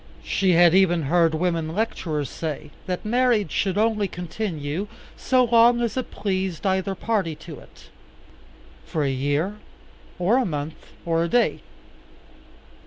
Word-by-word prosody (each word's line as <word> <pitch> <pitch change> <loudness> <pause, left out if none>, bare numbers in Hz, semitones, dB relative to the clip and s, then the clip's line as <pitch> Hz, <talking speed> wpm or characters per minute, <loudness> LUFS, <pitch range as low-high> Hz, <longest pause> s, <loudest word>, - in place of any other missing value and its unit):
She 190 -2 +1
had 170 0 +6
even 175 -3 +4
heard 165 +2 +2
women 165 -1 -1
lecturers 165 -9 -2
say, 150 +1 -5 0.2
that 180 +1 -3
marriage 235 -5 +2
should 195 -1 0
only 215 -1 +2
continue 175 -1 -4 0.3
so 255 -1 +2
long 235 0 +5
as 235 -3 -1
it 255 - -3
pleased 190 -3 -3
either 190 0 0
party 195 -7 -1
to 160 0 -10
it - - -18 0.9
for 155 - -2
a 140 - +1
year, 145 +9 -1 0.6
or 190 +8 +2
a 260 - +2
month, 150 -2 -5 0.2
or 165 0 +1
a - - 0
day. 245 +4 +2
180 Hz, 140 wpm, -24 LUFS, 160-215 Hz, 0.9 s, had